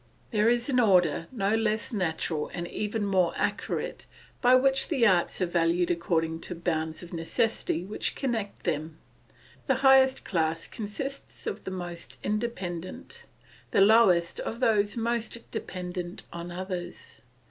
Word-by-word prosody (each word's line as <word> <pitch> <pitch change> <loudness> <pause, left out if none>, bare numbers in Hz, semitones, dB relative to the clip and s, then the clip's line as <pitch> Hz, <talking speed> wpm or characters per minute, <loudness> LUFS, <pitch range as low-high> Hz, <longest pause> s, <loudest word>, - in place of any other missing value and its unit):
There 215 -1 +3
is 240 0 +1
an 260 -3 +2
order 180 -7 +3
no 205 -4 0
less 225 +2 0
natural 160 -5 -1
and 175 0 -3
even 210 +2 -2
more 185 -3 +2
accurate, - - -2 0.3
by 250 0 +6
which 270 +1 +3
the 270 -8 +2
arts 180 -5 +3
are - - +4
valued 170 0 +1
according 165 -1 0
to 175 - -6
bonds 160 -1 -2
of 175 - -11
necessity 170 +1 -1
which 210 - -3
connect 225 -7 -3
them; 155 -1 -2 0.7
the 265 - +3
highest 265 0 +6
class 165 -2 0
consists 270 +6 -6
of - - -4
the - - -3
most 175 -2 -6
independent, 210 - -4 0.4
the - - +3
lowest 195 -5 +5
of 230 - -4
those 210 -3 +2
most 235 0 -2
dependent 180 -1 -5
on 170 +1 -6
others. 180 0 -6
190 Hz, 140 wpm, -28 LUFS, 170-230 Hz, 0.7 s, by